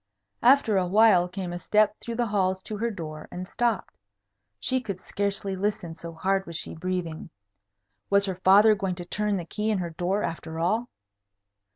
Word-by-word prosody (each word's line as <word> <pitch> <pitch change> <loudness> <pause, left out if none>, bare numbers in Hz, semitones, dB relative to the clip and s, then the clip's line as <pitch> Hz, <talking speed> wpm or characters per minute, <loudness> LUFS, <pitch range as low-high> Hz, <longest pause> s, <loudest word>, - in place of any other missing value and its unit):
After 245 -4 +5
a 180 - 0
while 195 -2 +5
came 185 -1 -5
a 175 - -4
step 210 +3 +3
through 235 - -5
the 240 0 +1
halls 190 -3 0
to 215 - -5
her 230 +3 0
door, 155 -7 -7
and 180 +1 -6
stopped. 235 -2 -1 0.6
She 260 - 0
could 200 -6 -5
scarcely 200 0 -2
listen, 190 -3 -2
so 170 0 -8
hard 190 +3 0
she - - -3
was - - -10
breathing. 180 -3 -3 0.8
Was 200 0 +4
her 190 - -2
father 205 +3 +7
going 195 -3 -2
to 175 -1 -7
turn 210 +2 -1
the 175 - -5
key 210 +6 -2
in 215 - +2
her 175 -2 -3
door, 180 +5 -1
after 160 -1 -5
all? 215 +9 0
195 Hz, 185 wpm, -26 LUFS, 175-210 Hz, 0.8 s, father